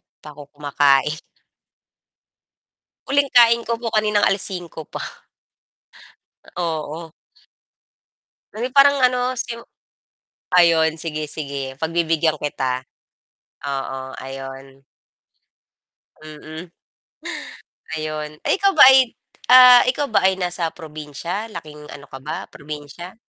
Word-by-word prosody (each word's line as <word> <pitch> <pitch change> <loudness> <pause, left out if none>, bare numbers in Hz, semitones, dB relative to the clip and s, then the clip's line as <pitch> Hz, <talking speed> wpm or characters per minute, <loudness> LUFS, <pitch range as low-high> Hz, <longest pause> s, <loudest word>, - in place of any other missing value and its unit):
'di - - -64
pa - - -9
ako 145 - -12
kumakain. 145 +1 +1 1.8
Huling 280 +1 +2
kain 235 -1 +5
ko 235 - 0
po 230 - -2
kaninang 215 -1 +1
5:00 180 -5 -1
pa. - - -7 1.5
Oo, 160 -1 -4 1.4
na - - -11
parang 280 0 +5
ano, 250 0 +2 1.2
ayon 165 -2 +4
sige 155 -2 -4
sige 140 -3 -5
pagbibigyan 160 0 0
kita. 130 -3 -3 0.8
Oo, 135 -1 -5
ayon. 135 0 -10 1.3
Mm. 155 +2 -10 1.3
Ayon 155 -1 -4 0.2
ay - - +2
ikaw 395 -1 +3
ba - - +8
ay 260 -3 +4 0.4
ah 250 -1 +9
ikaw 285 +3 0
ba - - +2
ay 190 - +1
nasa 175 -2 -2
probinsya 160 +5 -6
laking 150 -3 -10
ano 140 - -11
ka 135 - -9
ba 150 +4 -6
probinsya? 150 +4 -9
160 Hz, 100 wpm, -21 LUFS, 145-205 Hz, 1.8 s, ah